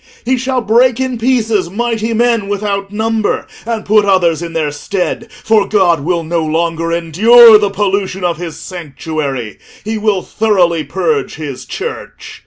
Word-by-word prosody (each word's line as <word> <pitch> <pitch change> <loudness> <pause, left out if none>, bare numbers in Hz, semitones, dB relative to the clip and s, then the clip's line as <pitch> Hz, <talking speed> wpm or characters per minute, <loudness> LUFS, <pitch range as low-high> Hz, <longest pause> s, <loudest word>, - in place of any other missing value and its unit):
He 260 +2 +2
shall 260 0 -1
break 235 +3 +2
in 260 -2 -2
pieces 225 -6 +1
mighty 225 +2 -2
men 230 -2 +1
without 200 -1 -3
number, 220 0 -1 0.2
and 225 -2 -3
put 210 0 +4
others 175 -5 +2
in 170 -1 -6
their 155 -2 -1
stead. 195 +8 -3
For 220 -2 +2
God 180 -6 +2
will 170 +3 -1
no 165 0 -1
longer 165 +1 -1
endure 215 +8 +6
the 205 -1 0
pollution 195 -1 -2
of 175 -3 0
his 170 -1 -7
sanctuary; 150 - -5 0.3
he 220 0 -2
will 210 -3 0
thoroughly 180 -7 +1
purge 445 - -2
his 145 -5 -7
Church. - - -7
200 Hz, 155 wpm, -14 LUFS, 170-225 Hz, 0.3 s, endure